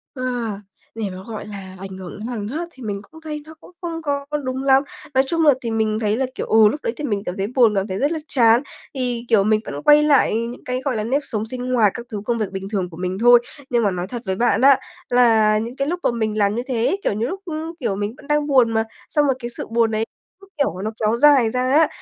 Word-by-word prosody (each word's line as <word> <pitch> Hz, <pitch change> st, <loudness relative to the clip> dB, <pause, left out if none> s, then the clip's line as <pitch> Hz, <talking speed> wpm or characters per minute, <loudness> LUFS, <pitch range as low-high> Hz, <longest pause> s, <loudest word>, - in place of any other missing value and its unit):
Ờ, 255 Hz, -, -5 dB, 0.7 s
để 220 Hz, -3 st, -3 dB
mà, 185 Hz, -, -8 dB
gọi 220 Hz, -2 st, -6 dB
là, 195 Hz, -3 st, -8 dB
ảnh 190 Hz, 0 st, -8 dB
hưởng 185 Hz, -2 st, -8 dB
đến 215 Hz, -, -5 dB
hằng 225 Hz, -5 st, -4 dB
hớt 320 Hz, +9 st, -4 dB
thì 260 Hz, -, -13 dB
mình 200 Hz, -2 st, -3 dB
cũng 320 Hz, 0 st, -14 dB
thấy 305 Hz, -1 st, -5 dB
nó 315 Hz, -, -11 dB
cũng -, -, -16 dB
không 335 Hz, -2 st, -4 dB
có 285 Hz, -2 st, -2 dB, 0.2 s
đúng 260 Hz, +1 st, -3 dB
lắm. 270 Hz, 0 st, +5 dB, 0.3 s
Nói 265 Hz, 0 st, +4 dB
chung 330 Hz, +2 st, +1 dB
là 295 Hz, -, +7 dB
thì 230 Hz, -, -3 dB
mình 220 Hz, -1 st, 0 dB
thấy 215 Hz, -1 st, 0 dB
là, 265 Hz, -, +1 dB
kiểu, -, -, -3 dB
ừ, 220 Hz, -1 st, +6 dB
lúc 295 Hz, +7 st, -4 dB
đấy 230 Hz, -, -1 dB
thì -, -, -6 dB
mình 205 Hz, -8 st, -1 dB
cảm 180 Hz, -, -4 dB
thấy 195 Hz, +1 st, -1 dB
buồn, 235 Hz, -5 st, +5 dB
cảm 195 Hz, +1 st, 0 dB
thấy 190 Hz, -1 st, -3 dB
rất 285 Hz, +3 st, +1 dB
là 325 Hz, -, -2 dB
chán 235 Hz, -4 st, +4 dB, 0.3 s
thì, 245 Hz, -3 st, -2 dB
kiểu, 220 Hz, -4 st, +4 dB
mình 215 Hz, +1 st, +3 dB
vẫn 145 Hz, +1 st, -6 dB
quay 295 Hz, 0 st, +6 dB
lại 285 Hz, -7 st, +4 dB
những 235 Hz, +2 st, -4 dB
cái, 255 Hz, 0 st, -3 dB
gọi 265 Hz, -4 st, 0 dB
là, 215 Hz, -, -1 dB
nếp 265 Hz, +6 st, 0 dB
sống 215 Hz, -4 st, -3 dB
sinh 250 Hz, +2 st, -5 dB
hoạt 220 Hz, -5 st, +4 dB
các 240 Hz, -, -7 dB
thứ 210 Hz, -4 st, -5 dB
công 235 Hz, +1 st, 0 dB
việc 215 Hz, -4 st, -2 dB
bình 195 Hz, 0 st, -5 dB
thường 190 Hz, -4 st, -2 dB
của 165 Hz, -, -12 dB
mình 180 Hz, +1 st, -3 dB
thôi. 240 Hz, +1 st, +7 dB, 0.3 s
Nhưng 240 Hz, -2 st, +2 dB
mà 200 Hz, -, +2 dB
nói 180 Hz, 0 st, -3 dB
thật 240 Hz, +3 st, -6 dB
với 190 Hz, -1 st, -1 dB
bạn 240 Hz, +5 st, +2 dB
á 275 Hz, 0 st, +6 dB, 0.3 s
là 225 Hz, -3 st, +4 dB
những 230 Hz, +3 st, -4 dB
cái 275 Hz, +1 st, -1 dB
lúc 350 Hz, +3 st, -2 dB
mà -, -, +3 dB
mình 220 Hz, -2 st, -2 dB
làm 205 Hz, 0 st, +2 dB
như 240 Hz, -, -1 dB
thế 240 Hz, -3 st, 0 dB
ấy, 390 Hz, -, +1 dB
kiểu -, -, +1 dB
như 220 Hz, +4 st, -1 dB
lúc, 385 Hz, +7 st, -5 dB, 0.4 s
kiểu, 195 Hz, -, -1 dB
mình 205 Hz, +2 st, -3 dB
vẫn -, -, -15 dB
đang 295 Hz, 0 st, +1 dB
buồn 255 Hz, -5 st, +4 dB
mà, 225 Hz, 0 st, +2 dB, 0.3 s
xong 295 Hz, -1 st, +2 dB
rồi 270 Hz, -2 st, +2 dB
cái 240 Hz, -1 st, -5 dB
sự 240 Hz, -, -7 dB
buồn 230 Hz, -1 st, +2 dB
ấy 220 Hz, +1 st, 0 dB, 0.3 s
cứ, 390 Hz, -, -17 dB
kiểu, 190 Hz, -, 0 dB
nó 215 Hz, -, -2 dB
kéo 220 Hz, +1 st, +2 dB
dài 275 Hz, -4 st, +5 dB
ra 250 Hz, -, -1 dB
á, 310 Hz, +3 st, +5 dB
230 Hz, 280 wpm, -21 LUFS, 210-270 Hz, 0.7 s, là